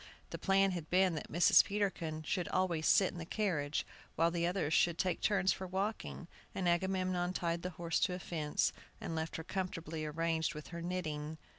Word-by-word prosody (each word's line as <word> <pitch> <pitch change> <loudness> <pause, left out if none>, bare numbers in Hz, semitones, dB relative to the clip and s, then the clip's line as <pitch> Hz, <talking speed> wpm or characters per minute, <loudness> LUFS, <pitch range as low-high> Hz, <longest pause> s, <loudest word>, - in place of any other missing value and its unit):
The - - -5
plan 195 0 +3
had 170 -4 -5
been 185 0 +4
that 155 - -5
Mrs. 170 +3 +7
Peterkin 190 -6 -2
should 175 +3 -1
always 175 -4 0
sit 190 - +5
in 175 - -8
the - - -4
carriage, 165 -6 -1 0.3
while 165 +1 +3
the 170 0 0
others 175 -4 0
should 170 -1 +3
take 185 -2 0
turns 190 -3 +3
for 190 - -6
walking; 190 -1 -3 0.3
and 185 -2 -1
Agamemnon 185 0 +1
tied 170 -1 -1
the 180 - -3
horse 170 -1 0
to 180 - +1
a - - -6
fence, 155 -4 -1 0.3
and - - -4
left 160 0 -3
her 160 - -4
comfortably 165 -3 -4
arranged 160 +1 -1
with 150 - -8
her 170 -1 -6
knitting. 160 -3 -3
175 Hz, 190 wpm, -34 LUFS, 160-185 Hz, 0.3 s, Mrs